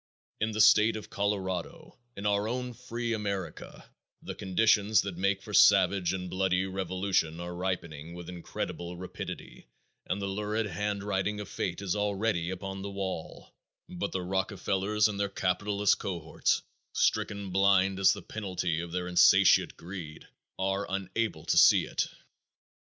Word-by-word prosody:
In 110 - +1
the 110 0 +1
state 105 +1 +6
of 110 - -8
Colorado 95 -4 -3 0.2
in 100 - -6
"our 105 0 +1
own 125 +1 -3
free 120 -1 -4
America" 100 -6 -5 0.4
the - - -5
conditions 105 +2 +3
that 100 -3 -5
make 95 +2 0
for - - -9
savage 95 -4 +5
and 90 -1 -4
bloody 95 0 +1
revolution 95 -3 -1
are 85 0 -5
ripening 85 -3 -4
with 85 -1 -9
incredible 85 0 -5
rapidity 90 -8 -8 0.4
and 95 - -1
the 100 - -3
lurid 105 +3 -1
handwriting 105 0 -2
of 105 - -6
fate 90 +2 -3
is 95 -1 -1
already 105 -3 0
upon 95 +1 -5
the 100 - -5
wall, 95 -4 -6 0.3
but 90 +3 -4
the 95 - -2
Rockefellers 95 +2 0
and 100 -2 -4
their 100 -1 0
capitalist 100 +2 +1
cohorts, 85 -5 -1 0.3
stricken 100 -2 0
blind 95 0 +3
as 95 - +6
the - - -4
penalty 90 -6 -2
of 85 0 -5
their 90 0 -2
insatiate 90 0 +5
greed, 85 -4 -8 0.3
are 95 +1 -1
unable 100 +4 -2
to - - +1
see - - +6
it. - - -1
95 Hz, 145 wpm, -29 LUFS, 90-105 Hz, 0.4 s, state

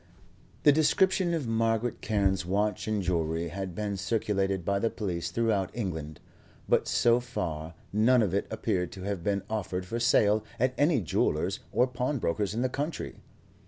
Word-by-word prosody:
The 145 - +8
description 180 +4 +3
of 150 -7 -3
Margaret 115 +1 0
Carne's 100 -3 +1
watch 100 +3 -1
and 105 -2 0
jewellery 85 -1 -1
had 95 0 -5
been 100 -1 -2
circulated 95 -2 0
by 100 0 +1
the 115 - +1
police 90 -8 -3
throughout 110 -5 +1
England, 80 -9 -4 0.5
but - - +2
so 120 0 +4
far 85 -10 -4 0.2
none 115 +3 +4
of 95 -4 -1
it 100 - 0
appeared 90 -2 -1
to 95 - -8
have 100 -3 -3
been 100 0 0
offered 95 -4 -3
for 115 +6 -3
sale 110 -3 +3 0.2
at 125 +2 +2
any 145 -3 +3
jeweller's 85 - 0
or 125 - +4
pawnbroker's 125 - -1
in 120 - 0
the - - +3
country. 145 +4 -4
105 Hz, 160 wpm, -29 LUFS, 95-120 Hz, 0.5 s, The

